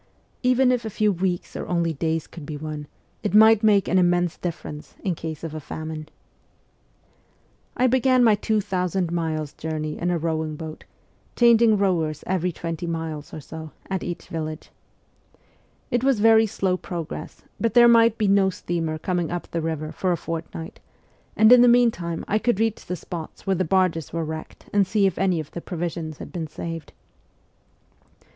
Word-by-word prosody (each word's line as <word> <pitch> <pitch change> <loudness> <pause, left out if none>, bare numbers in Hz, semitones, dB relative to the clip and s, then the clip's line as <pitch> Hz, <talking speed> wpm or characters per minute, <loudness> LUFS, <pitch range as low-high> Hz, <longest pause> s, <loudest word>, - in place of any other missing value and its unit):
Even 255 0 +4
if 250 -1 0
a 220 - -4
few 210 0 +1
weeks 180 -1 -2
or - - -5
only 170 -2 0
days 160 +1 -1
could 165 - -11
be 150 +1 -6
won, 150 -1 -6 0.3
it 210 -1 -1
might 220 0 +7
make 205 -3 +4
an 185 - +3
immense 175 -1 +2
difference 160 -4 -6
in 190 - 0
case 160 -1 -6
of 165 -2 -5
a 155 - -4
famine. 155 +1 -7 1.7
I 250 - +3
began 255 0 +4
my 225 -2 +6
two 210 +1 +1
thousand 180 -3 -1
miles' 160 -3 -2
journey 155 -1 -4
in 175 - 0
a 175 - +1
rowing 160 -1 -2
boat, 155 0 -8 0.5
changing 230 -2 +5
rowers 165 -6 0
each 180 -2 0
twenty 165 +1 -4
miles 160 -3 -4
or - - -7
so, 160 +1 -9 0.2
at 190 -1 -1
each 175 - -5
village. 155 -1 -5 1.2
It 245 0 +1
was 265 -4 +3
very 225 +1 +6
slow 190 -2 0
progress, 170 -3 -7 0.2
but 230 +1 0
there 240 0 +8
might 230 -1 +5
be 210 - +1
no 195 -1 +4
steamer 165 -3 -3
coming 175 0 -1
up 175 0 -5
the 165 - -1
river 155 -1 -3
for 185 - -1
a 175 - +1
fort 165 0 -4
night, 165 0 -8 0.6
and 220 +2 +7
in 250 -1 +9
the 245 - +7
meantime 230 -9 +2
I 215 - +1
could 240 -3 +1
reach 225 -1 0
the 180 - -2
spots 165 -1 -8
where 195 -1 +2
the 185 +1 0
barges 180 -3 +1
were 165 -1 -2
wrecked 160 0 -7
and 200 -2 +3
see 205 0 +2
if 195 - 0
any 185 -3 +2
of 155 -1 -7
the 170 - -6
provisions 165 -3 -4
had - - -9
been 165 -3 -4
saved. 165 +1 -6
175 Hz, 180 wpm, -24 LUFS, 160-210 Hz, 1.7 s, in